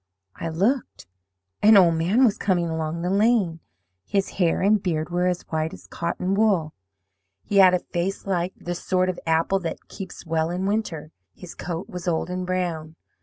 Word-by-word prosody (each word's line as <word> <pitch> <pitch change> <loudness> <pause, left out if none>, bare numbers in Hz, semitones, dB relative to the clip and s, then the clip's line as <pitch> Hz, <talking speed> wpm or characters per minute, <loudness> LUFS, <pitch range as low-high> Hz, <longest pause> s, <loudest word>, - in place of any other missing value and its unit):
"I 165 - -4
looked. 205 +12 -1 0.6
An 215 0 +7
old 175 -3 +6
man 185 +11 +3
was 215 - +3
coming 175 -4 0
along 160 +1 -3
the 180 - 0
lane. 200 -5 +2 0.4
His 195 - -1
hair 170 -2 +3
and 205 +1 +3
beard 160 -3 -2
were 180 +1 +1
as 180 -1 -1
white 160 0 -2
as - - -16
cotton 180 +2 -2
wool. 195 -7 +2 0.7
He 205 - -1
had 185 -2 +7
a - - +1
face 175 +3 -3
like 185 -1 -1
the 175 - -4
sort 185 +1 0
of 180 - -3
apple 165 +4 +2
that 170 -3 -6
keeps 190 -2 -9
well 160 0 0
in 180 +2 -2
winter; 195 -7 -2 0.2
his 180 -2 -10
coat 175 0 -5
was 180 0 -7
old 170 +1 0
and 180 0 -3
brown. 170 -4 -2
180 Hz, 180 wpm, -24 LUFS, 165-195 Hz, 0.7 s, An